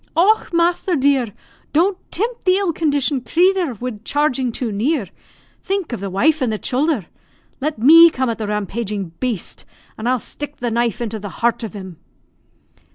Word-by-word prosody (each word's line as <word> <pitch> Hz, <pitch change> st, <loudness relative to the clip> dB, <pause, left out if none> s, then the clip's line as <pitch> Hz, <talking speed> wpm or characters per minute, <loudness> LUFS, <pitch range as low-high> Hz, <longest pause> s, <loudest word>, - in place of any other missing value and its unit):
"Och, 410 Hz, +6 st, +3 dB
masther, 345 Hz, +1 st, +1 dB
dear! 270 Hz, -3 st, +2 dB, 0.5 s
don't 360 Hz, +6 st, +3 dB, 0.2 s
timpt 460 Hz, +6 st, -2 dB
the 370 Hz, 0 st, +4 dB
ill 385 Hz, -3 st, 0 dB
conditioned 285 Hz, -4 st, 0 dB
crathur 355 Hz, -5 st, +2 dB
wid 240 Hz, -4 st, -5 dB
charging 265 Hz, -4 st, 0 dB
too 230 Hz, 0 st, -3 dB
near; 225 Hz, -, -1 dB, 0.5 s
think 385 Hz, -8 st, -2 dB
of 235 Hz, -, -3 dB
the 200 Hz, 0 st, -4 dB
wife 295 Hz, +11 st, +2 dB
and 250 Hz, -3 st, +1 dB
the 215 Hz, -, -1 dB
childher. 260 Hz, -, 0 dB, 0.5 s
Let 295 Hz, 0 st, -2 dB
me 325 Hz, +9 st, +8 dB
come 260 Hz, -4 st, -2 dB
at 230 Hz, -1 st, -2 dB
the 215 Hz, -, -3 dB
rampaging 210 Hz, -2 st, -3 dB
baste, 240 Hz, -8 st, -4 dB, 0.4 s
an' 220 Hz, -, -3 dB
I'll 255 Hz, +1 st, +3 dB
stick 290 Hz, +4 st, -7 dB
the 240 Hz, -1 st, -2 dB
knife 235 Hz, -1 st, 0 dB
into 220 Hz, -2 st, -3 dB
the 205 Hz, 0 st, -6 dB
heart 235 Hz, +4 st, -1 dB
of 220 Hz, -, -5 dB
him." 190 Hz, -4 st, -8 dB
255 Hz, 170 wpm, -19 LUFS, 220-325 Hz, 0.5 s, me